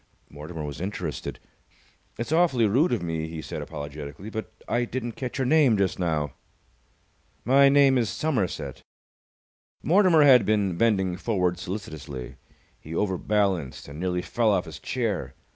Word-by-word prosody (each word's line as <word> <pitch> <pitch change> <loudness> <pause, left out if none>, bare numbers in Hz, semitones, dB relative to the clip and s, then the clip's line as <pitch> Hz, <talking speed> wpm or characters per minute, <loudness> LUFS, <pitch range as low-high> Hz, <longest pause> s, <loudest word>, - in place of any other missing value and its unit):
Mortimer 75 +2 -7
was 75 +2 -6
interested. 90 -5 -4 0.8
"It's 120 +5 -4
awfully 160 -8 +3
rude 130 - +3
of 115 -7 0
me," 80 -2 -2
he 80 0 -7
said, - - -6
apologetically, 75 +5 -7
"but 110 0 -5 0.2
I 120 - +1
didn't 120 0 -3
catch 125 +3 -5
your 135 - 0
name 135 -5 +4
just 95 -2 0
now." 75 -6 -1 1.1
"My 140 +3 +6
name 135 -2 +5
is 115 -3 0
Somerset." 90 - -2 1.0
Mortimer 175 -1 +5
had 130 -5 +7
been 100 -3 +1
bending 95 -4 +1
forward 90 -4 0
solicitously. 80 - -6 0.4
He 80 +2 -8
overbalanced 95 -5 0
and 70 +2 -9
nearly 90 0 -1
fell 115 +4 +1
off 95 -4 +2
his 80 - -9
chair. 115 -6 -2
100 Hz, 145 wpm, -26 LUFS, 80-120 Hz, 1.1 s, had